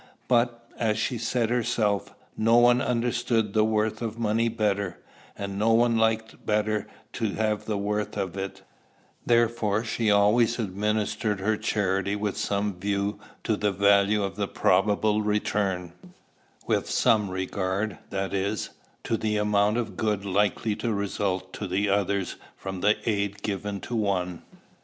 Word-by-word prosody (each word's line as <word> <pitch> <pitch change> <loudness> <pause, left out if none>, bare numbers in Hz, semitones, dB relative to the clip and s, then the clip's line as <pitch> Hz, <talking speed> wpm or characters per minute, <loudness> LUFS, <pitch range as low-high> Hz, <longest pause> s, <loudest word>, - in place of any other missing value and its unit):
But, 120 -1 +1
as 110 -2 +1
she 120 +2 -1
said 115 0 0
herself, 110 -4 0 0.2
no 115 +2 +4
one 120 +1 +5
understood 120 -3 0
the 110 - +4
worth 110 0 0
of 115 -1 -3
money 115 +1 +1
better; 100 -4 -1 0.4
and 100 0 -4
no 115 +2 +3
one 115 0 +4
liked 110 0 0
better 105 0 0 0.3
to 110 -3 -2
have 110 -1 -1
the 105 -2 -1
worth 105 +1 -2
of 95 -3 -2
it: 95 0 -5 0.6
therefore 115 -3 +2
she 115 -1 0
always 105 +4 +4
administered 105 0 -1
her 110 +3 +1
charity 100 -1 0
with 105 -1 -2
some 100 -2 -1
view 100 +1 -1 0.2
to 110 - +1
the 105 0 0
value 100 +1 +3
of 95 0 -4
the 100 -1 -1
probable 105 +3 +2
return, 100 -4 -1 0.7
with - - 0
some 105 -3 +3
regard, 95 +2 -2
that 95 0 -3
is, 100 +2 -1 0.3
to 115 - 0
the 105 -1 -1
amount 105 +1 +2
of 120 - -3
good 105 -2 0
likely 105 +2 +1
to 120 - -1
result 95 -2 -2
to 95 +3 -1
others 100 -1 0 0.2
from 95 -2 -6
the 105 +1 +4
aid 100 -1 -1
given 100 0 -3
to 120 - -5
one. 90 -5 -1
105 Hz, 145 wpm, -26 LUFS, 100-110 Hz, 0.7 s, one